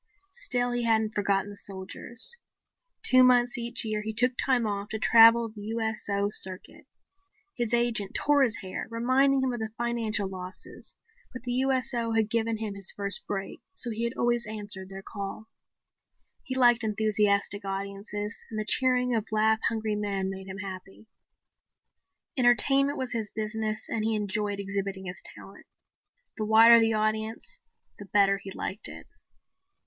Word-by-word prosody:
Still 250 Hz, -, -1 dB
he 245 Hz, 0 st, -1 dB
hadn't 220 Hz, -1 st, +1 dB
forgotten 200 Hz, -1 st, -1 dB
the -, -, -11 dB
soldiers. 200 Hz, -, +4 dB, 0.7 s
Two 255 Hz, -11 st, +6 dB
months 245 Hz, 0 st, +3 dB
each 235 Hz, 0 st, +1 dB
year 215 Hz, -1 st, -2 dB
he 215 Hz, 0 st, -6 dB
took 250 Hz, +2 st, +3 dB
time 250 Hz, -3 st, +1 dB
off 205 Hz, 0 st, -4 dB
to 220 Hz, -, -4 dB
travel 230 Hz, +1 st, +5 dB
the 215 Hz, -1 st, -12 dB
USO 215 Hz, -2 st, -2 dB
circuit. 185 Hz, -2 st, 0 dB, 0.7 s
His 240 Hz, -3 st, -2 dB
agent 235 Hz, -4 st, +2 dB
tore 290 Hz, -1 st, +2 dB
his 240 Hz, -4 st, +1 dB
hair, 185 Hz, -2 st, -7 dB
reminding 260 Hz, +4 st, +1 dB
him 260 Hz, -1 st, -1 dB
of 240 Hz, -, -5 dB
the 220 Hz, 0 st, -4 dB
financial 230 Hz, -4 st, +1 dB
losses, 185 Hz, 0 st, -9 dB, 0.4 s
but 255 Hz, -2 st, -10 dB
the 245 Hz, -, -4 dB
USO 255 Hz, -3 st, 0 dB
had 220 Hz, -1 st, 0 dB
given 230 Hz, -1 st, 0 dB
him 215 Hz, -2 st, -5 dB
his 200 Hz, -1 st, -1 dB
first 200 Hz, 0 st, +5 dB
break 195 Hz, -1 st, -6 dB
so 245 Hz, -10 st, 0 dB
he 225 Hz, +1 st, -3 dB
had 235 Hz, +1 st, -2 dB
always 240 Hz, -1 st, 0 dB
answered 205 Hz, -3 st, -5 dB
their 195 Hz, 0 st, -10 dB
call. 200 Hz, +2 st, -7 dB, 0.9 s
He 260 Hz, -, -6 dB
liked 240 Hz, -2 st, +4 dB
enthusiastic 210 Hz, -2 st, 0 dB
audiences 200 Hz, +2 st, -5 dB
and 215 Hz, -, -5 dB
the 215 Hz, -, -3 dB
cheering 250 Hz, 0 st, +4 dB
of 220 Hz, -1 st, -2 dB
laugh 220 Hz, 0 st, +2 dB
hungry 220 Hz, -1 st, -3 dB
men 200 Hz, -2 st, -3 dB
made 190 Hz, 0 st, -9 dB
him 190 Hz, 0 st, -8 dB
happy. 195 Hz, +1 st, -10 dB, 1.3 s
Entertainment 270 Hz, +3 st, +3 dB
was 260 Hz, -1 st, -4 dB
his 225 Hz, -3 st, -3 dB
business 215 Hz, 0 st, -4 dB
and 220 Hz, -, -3 dB
he 220 Hz, 0 st, 0 dB
enjoyed 205 Hz, 0 st, -3 dB
exhibiting 195 Hz, -1 st, -4 dB
his 180 Hz, 0 st, -7 dB
talent. -, -, -15 dB, 0.7 s
The 215 Hz, -, -3 dB
wider 225 Hz, +2 st, +7 dB
the 225 Hz, 0 st, +1 dB
audience 220 Hz, -, -3 dB, 0.4 s
the 205 Hz, -, -9 dB
better 195 Hz, 0 st, +2 dB
he 195 Hz, -, -10 dB
liked 195 Hz, +2 st, -3 dB
it. -, -, -11 dB
220 Hz, 160 wpm, -27 LUFS, 200-240 Hz, 1.3 s, wider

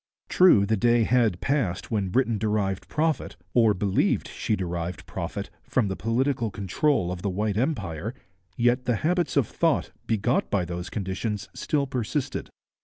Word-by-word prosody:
True, 180 Hz, -, +6 dB
the 110 Hz, +2 st, +2 dB
day 120 Hz, +2 st, +4 dB
had 110 Hz, -6 st, +2 dB
passed 135 Hz, -12 st, -1 dB
when 100 Hz, -4 st, 0 dB
Britain 115 Hz, 0 st, +1 dB
derived 105 Hz, -3 st, -1 dB
profit, 155 Hz, +1 st, -1 dB, 0.2 s
or 115 Hz, -4 st, +4 dB
believed 95 Hz, +1 st, +1 dB
she 110 Hz, -, -1 dB
derived 85 Hz, -2 st, -4 dB
profit, -, -, -5 dB
from 115 Hz, -6 st, 0 dB
the 95 Hz, -, -2 dB
political 120 Hz, +2 st, 0 dB
control 100 Hz, -, 0 dB
of 90 Hz, -1 st, -5 dB
the 100 Hz, -, -1 dB
white 105 Hz, +2 st, -1 dB
empire, 110 Hz, -, -2 dB, 0.4 s
yet 120 Hz, +2 st, +2 dB
the 120 Hz, -1 st, +2 dB
habits 175 Hz, -2 st, +1 dB
of 140 Hz, -, +4 dB
thought 165 Hz, -5 st, +1 dB, 0.2 s
begot 115 Hz, +3 st, +1 dB
by 95 Hz, -4 st, +1 dB
those 90 Hz, +1 st, -5 dB
conditions 100 Hz, +1 st, -3 dB
still 145 Hz, -2 st, 0 dB
persisted. 130 Hz, +1 st, -3 dB
110 Hz, 155 wpm, -26 LUFS, 95-130 Hz, 0.4 s, True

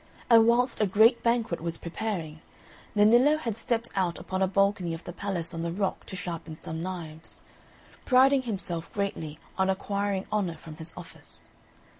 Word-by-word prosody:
And 225 Hz, -1 st, +8 dB
whilst 245 Hz, 0 st, +2 dB
a 210 Hz, -, +4 dB
great 220 Hz, +5 st, +5 dB
banquet 235 Hz, -7 st, +1 dB
was 165 Hz, 0 st, -2 dB
preparing, 170 Hz, -4 st, -4 dB, 0.5 s
Nennillo 240 Hz, +8 st, +6 dB
had 230 Hz, -8 st, -3 dB
stepped 230 Hz, +1 st, -1 dB
out 185 Hz, -3 st, 0 dB
upon 190 Hz, 0 st, -4 dB
a 190 Hz, -, +4 dB
balcony 195 Hz, -3 st, +1 dB
of 165 Hz, -, -10 dB
the 175 Hz, -, -7 dB
palace 180 Hz, -3 st, -3 dB
on 165 Hz, -, -4 dB
the 170 Hz, 0 st, -2 dB
rock 195 Hz, +2 st, -2 dB
to -, -, -6 dB
sharpen 165 Hz, -3 st, -6 dB
some 160 Hz, 0 st, -5 dB
knives, 165 Hz, -3 st, -7 dB, 0.6 s
priding 265 Hz, +1 st, +5 dB
himself 190 Hz, -8 st, -4 dB
greatly 165 Hz, -7 st, -3 dB, 0.2 s
on 190 Hz, 0 st, +3 dB
acquiring 200 Hz, 0 st, -1 dB
honour 190 Hz, -6 st, 0 dB
from 155 Hz, 0 st, -11 dB
his 160 Hz, +1 st, -5 dB
office. 175 Hz, -2 st, -10 dB
190 Hz, 165 wpm, -28 LUFS, 170-220 Hz, 0.6 s, And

